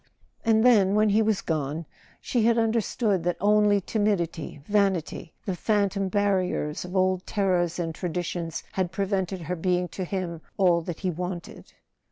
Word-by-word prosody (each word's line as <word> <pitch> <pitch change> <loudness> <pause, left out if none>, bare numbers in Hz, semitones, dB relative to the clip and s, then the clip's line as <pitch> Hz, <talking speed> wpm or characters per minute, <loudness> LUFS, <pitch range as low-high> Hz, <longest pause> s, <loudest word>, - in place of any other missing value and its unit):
And 225 0 +3
then, 205 -5 +5
when 215 0 +4
he 210 +2 +4
was 220 -2 +1
gone, 155 0 -2 0.3
she 245 - -1
had 235 0 +4
understood 220 -4 +1
that 175 0 0
only 210 0 +4
timidity, 195 -7 -1
vanity, 195 -5 0
the 190 - -2
phantom 200 -1 0
barriers 185 -6 0
of 180 +1 -7
old 185 -1 +2
terrors 180 -5 +1
and 165 -2 -2
tradi¬ 175 0 -3
tions, 165 -1 -4
had 185 -2 -1
prevented 190 -1 -1
her 180 +2 -3
being 180 +1 0
to 190 - -5
him 180 -3 -4 0.2
all 175 -3 +4
that 165 0 -6
he 185 -2 0
wanted. 175 +1 -6
185 Hz, 160 wpm, -26 LUFS, 175-205 Hz, 0.3 s, then